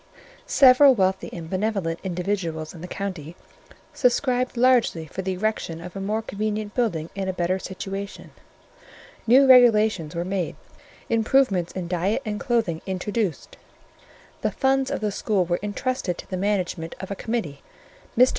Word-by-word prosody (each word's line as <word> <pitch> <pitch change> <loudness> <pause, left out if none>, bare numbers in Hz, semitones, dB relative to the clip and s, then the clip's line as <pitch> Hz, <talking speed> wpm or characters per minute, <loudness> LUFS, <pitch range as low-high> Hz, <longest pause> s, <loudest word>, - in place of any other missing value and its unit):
Several 265 0 +7
wealthy 190 -2 0
and 165 -2 -7
benevolent 185 -3 -1
individuals 175 -4 -3
in 170 - -11
the 180 - -6
county 180 -5 -5 0.6
subscribed 250 -1 +1
largely 240 -9 +3
for 155 +5 -6
the 190 0 -2
erection 185 -4 -2
of 180 +2 -9
a 195 - -4
more 215 +3 -1
convenient 215 0 -3
building 170 -10 -1
in 195 -1 -3
a 190 - -1
better 180 +1 0
situation; 195 +1 -6 1.0
new 260 +4 +7
regulations 215 -10 +5
were 170 +1 -2
made; 185 -2 -2 0.5
improvements 225 -6 +2
in 185 -2 -4
diet 180 +4 -1
and 210 -1 -3
clothing 225 -11 0
introduced; 190 -2 -3 0.8
the - - +1
funds 270 0 +1
of - - -3
the 210 -1 0
school 195 -2 0
were 175 0 0
intrusted 210 -2 -2
to - - -9
the 185 - -4
management 185 -4 -2
of 190 +1 -7
a - - -2
committee. 185 -12 -3 0.6
Mr. 250 +2 +7
195 Hz, 150 wpm, -24 LUFS, 180-225 Hz, 1.0 s, Several